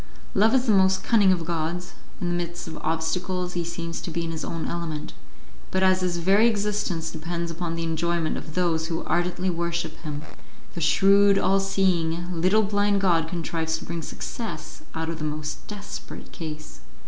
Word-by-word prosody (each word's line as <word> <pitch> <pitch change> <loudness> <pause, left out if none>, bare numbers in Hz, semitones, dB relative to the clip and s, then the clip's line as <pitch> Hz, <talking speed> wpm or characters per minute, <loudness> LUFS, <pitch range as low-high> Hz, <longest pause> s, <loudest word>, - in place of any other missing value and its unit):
Love 220 +5 +4
is 255 -1 +3
the 230 - +4
most 190 -1 +4
cunning 205 -5 +5
of 170 -3 +1
gods; 170 +2 -2 0.3
in 180 - -2
the 175 - 0
midst 175 0 -3
of 160 - -6
obstacles 180 +3 -1
he 175 - -1
seems 170 0 -4
to - - -5
be 170 +1 -2
in 165 - -3
his 160 -1 -4
own 165 -1 -3
element, 165 -3 -4 0.6
but 190 0 +1
as 185 0 +4
his 180 -1 0
very 195 +6 +5
existence 205 -6 0
depends 170 +1 -3
upon 165 0 -3
the 165 - -2
enjoyment 165 0 0
of 155 - -7
those 165 -3 +1
who 165 -1 -2
ardently 180 +1 0
worship 170 0 -2
him, 150 -2 -6 0.5
the 170 - -5
shrewd, 200 +4 +5
all 195 0 +3
seeing, 180 -3 +1
little 205 +5 +4
blind 205 0 +2
god 170 -4 +3
contrives 165 -1 -2
to - - -9
bring 170 0 -4
success 65 - -6
out 160 0 -2
of 165 0 -3
the - - -4
most 150 0 -4
desperate 205 -1 -8
case. 155 - -7
170 Hz, 185 wpm, -25 LUFS, 165-190 Hz, 0.6 s, cunning